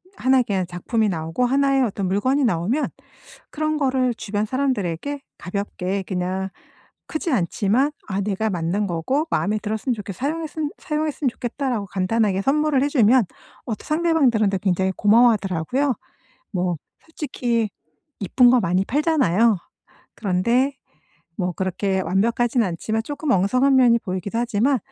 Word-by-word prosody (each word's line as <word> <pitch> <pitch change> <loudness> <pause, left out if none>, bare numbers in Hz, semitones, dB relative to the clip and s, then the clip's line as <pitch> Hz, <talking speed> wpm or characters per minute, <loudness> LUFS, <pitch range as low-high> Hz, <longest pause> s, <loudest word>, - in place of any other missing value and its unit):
1 260 -3 +3
의 250 - +3
그냥 195 -4 -1
작품이 210 +5 -1
나오고 165 +6 -1
1 275 +2 +2
의 270 - +3
어떤 200 -4 -1
물건이 255 +9 +1
나오면 220 - 0 0.6
그런 310 0 -1
거를 260 -3 +1
주변 210 -1 -2
사람들에게 260 - -2 0.2
가볍게 195 0 -3
그냥 185 +1 -2 0.6
크지 315 +1 -3
않지만 220 +5 +1 0.2
"아 195 -1 -1
내가 210 +2 -1
만든 180 +3 -1
거고 200 - -1
마음에 210 +2 +1
들었으면 220 +4 -2
좋겠어. 200 -4 -7
사용했음 310 +1 -2
사용했으면 300 -2 -1
좋겠다."라고 245 -3 -3
간단하게 195 +1 0
선물을 290 0 +2
해 285 - +2
주면 250 -4 +4 0.4
어 235 - -3
상대방들한테 275 - +2
굉장히 190 0 0
고마워하더라고요. 220 - +3 0.6
뭐 180 -2 0 0.2
솔직히 245 -8 -2 0.5
이쁜 240 +5 +4
거 250 - +5
많이 180 +3 +1
팔잖아요. 235 - +2 0.6
그런데 235 +8 +1 0.6
뭐 180 -2 -1
그렇게 190 +1 -1
완벽하진 235 +6 +1
않지만 215 +4 -2
쪼끔 290 +2 -3
엉성한 255 +8 +3
면이 245 -3 +6
보이기도 190 +2 -4
하지만 240 +3 +2
225 Hz, 335 characters per minute, -22 LUFS, 190-270 Hz, 0.6 s, 면이